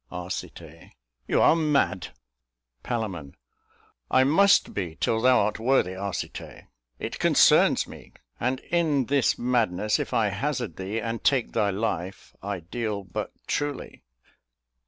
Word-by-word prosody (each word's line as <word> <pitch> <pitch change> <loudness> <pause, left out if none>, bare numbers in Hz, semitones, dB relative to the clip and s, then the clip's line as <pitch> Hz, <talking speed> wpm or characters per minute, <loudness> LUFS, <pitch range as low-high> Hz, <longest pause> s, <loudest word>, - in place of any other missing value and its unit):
Arc. 90 +3 -5 0.9
You - - +2
are - - +6
mad. 150 -3 +1 0.7
Pal. 100 - -4 0.8
I 130 - +4
must 195 +9 +4
be, 90 -5 -4
Till 110 +6 0
thou 130 +1 +5
art 105 +1 -1
worthy, 115 -6 +1
Arcite; 100 0 -6 0.3
it - - -6
concerns - - +4
me! - - -13 0.3
And, 130 +2 -1
in 155 -6 +2
this 140 +1 +2
madness, 110 -5 +1
if - - -3
I 110 -3 +2
hazard 120 - -3
thee 95 +4 -3
And 115 +1 -4
take 135 -4 +2
thy 100 - +1
life, 95 -2 -4
I 100 -2 -4
deal 105 +3 -4
but 90 - -5
truly. 145 -1 -3
115 Hz, 130 wpm, -26 LUFS, 95-130 Hz, 0.9 s, are